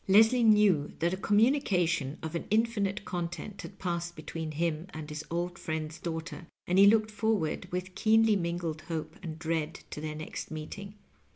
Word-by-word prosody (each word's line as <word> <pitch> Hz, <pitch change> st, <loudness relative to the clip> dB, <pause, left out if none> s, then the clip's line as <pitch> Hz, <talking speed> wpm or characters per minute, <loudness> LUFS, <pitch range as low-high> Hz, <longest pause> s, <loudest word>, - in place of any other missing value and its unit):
Leslie 220 Hz, +5 st, +6 dB
knew 210 Hz, -9 st, +5 dB
that 170 Hz, +2 st, +1 dB
a -, -, -1 dB
commnnication 195 Hz, -, +2 dB
of 160 Hz, 0 st, -4 dB
an 170 Hz, -, -1 dB
ipfinite 210 Hz, -3 st, +1 dB
content 175 Hz, +3 st, -4 dB
had 195 Hz, -, -10 dB
passed 170 Hz, -1 st, -3 dB
between 160 Hz, +1 st, -5 dB
him 165 Hz, +2 st, -1 dB
and 155 Hz, -1 st, -6 dB
his 150 Hz, 0 st, -4 dB
old 175 Hz, +1 st, -2 dB
friend's 155 Hz, 0 st, -4 dB
daughter, 165 Hz, 0 st, -5 dB, 0.2 s
and 180 Hz, +2 st, +2 dB
he 200 Hz, -, +9 dB
looked 215 Hz, 0 st, +4 dB
forward 215 Hz, -6 st, 0 dB
with 180 Hz, +1 st, -3 dB
keenly 220 Hz, +1 st, +4 dB
mingled 170 Hz, -3 st, -2 dB
hope 160 Hz, -1 st, -4 dB
and 160 Hz, -4 st, -6 dB
dread 160 Hz, -1 st, -1 dB, 0.2 s
to 150 Hz, -, -5 dB
their 155 Hz, 0 st, -4 dB
next 155 Hz, +1 st, -6 dB
meeting. 195 Hz, +6 st, -7 dB
175 Hz, 170 wpm, -30 LUFS, 160-205 Hz, 0.2 s, he